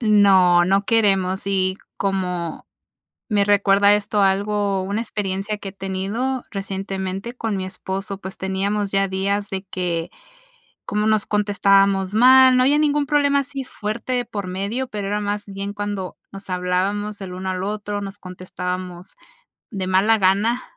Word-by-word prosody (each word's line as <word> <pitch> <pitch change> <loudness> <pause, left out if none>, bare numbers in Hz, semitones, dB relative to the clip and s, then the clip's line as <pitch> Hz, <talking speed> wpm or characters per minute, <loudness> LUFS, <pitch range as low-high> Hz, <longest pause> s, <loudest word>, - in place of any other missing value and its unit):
No, 195 -5 +5
no 195 +2 +2
queremos 195 -4 +2
y, 190 -1 +1 0.2
como 180 -4 -2 0.6
me 205 -2 +2
recuerda 200 0 +4
esto 205 0 0
algo, 200 0 +1
una 200 +3 -2
experiencia 205 -2 -3
que 195 - -7
he - - -17
tenido 200 +7 -3
recientemente 195 +2 -4
con 225 -4 -3
mi 190 - -3
esposo, 190 +1 -5
pues 190 0 -7
teníamos 195 +2 -1
ya 195 0 +2
días 200 +2 -1
de 190 0 -4
que, 175 -3 -3 0.8
como 210 +1 0
nos 215 -1 +2
contestábamos 195 -1 +2
mal, 255 +3 +7
no 255 - +4
había 285 +3 +4
ningún 295 -1 +2
problema 285 -1 +3
así 275 0 -4
fuerte 215 +4 -4
de 245 -1 +1
por 205 -4 -5
medio, 200 +8 -3
pero 205 -4 -5
era 205 +1 -1
más 205 0 -3
bien 200 +1 -5
cuando 205 -3 -4 0.2
nos 195 0 -10
hablábamos 190 +3 -1
el 185 -1 -6
uno 185 +1 -4
al 185 0 -3
otro, 205 0 -3
nos 195 0 -7
contestábamos 180 0 -6 0.6
de 190 -3 -3
mala 200 +4 +3
gana 205 +6 +2
200 Hz, 155 wpm, -21 LUFS, 190-210 Hz, 0.8 s, mal